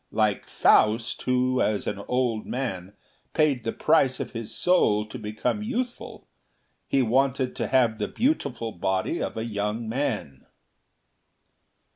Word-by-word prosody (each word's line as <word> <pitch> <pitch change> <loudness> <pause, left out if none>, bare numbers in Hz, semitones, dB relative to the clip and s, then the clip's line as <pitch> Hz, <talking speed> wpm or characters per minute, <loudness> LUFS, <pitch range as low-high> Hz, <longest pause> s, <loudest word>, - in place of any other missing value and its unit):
Like 105 -2 0
Faust, 110 +2 +3
who, 125 0 +2
as 105 -1 0
an 100 - -3
old 125 -4 0
man, 100 -8 -4 0.4
paid 145 -6 +2
the 115 - -1
price 145 -5 +2
of - - -4
his 115 -3 -6
soul 105 -13 +2
to 110 +4 -8
become 110 - -2
youthful, 245 +2 -4 0.6
he 135 - +2
wanted 130 +2 +1
to - - -1
have 120 -4 +2
the 105 - -1
beautiful 140 - -1
body 95 0 -1
of - - -3
a 110 - -2
young 105 +1 -2
man." 110 - -3
115 Hz, 135 wpm, -26 LUFS, 105-135 Hz, 0.6 s, Faust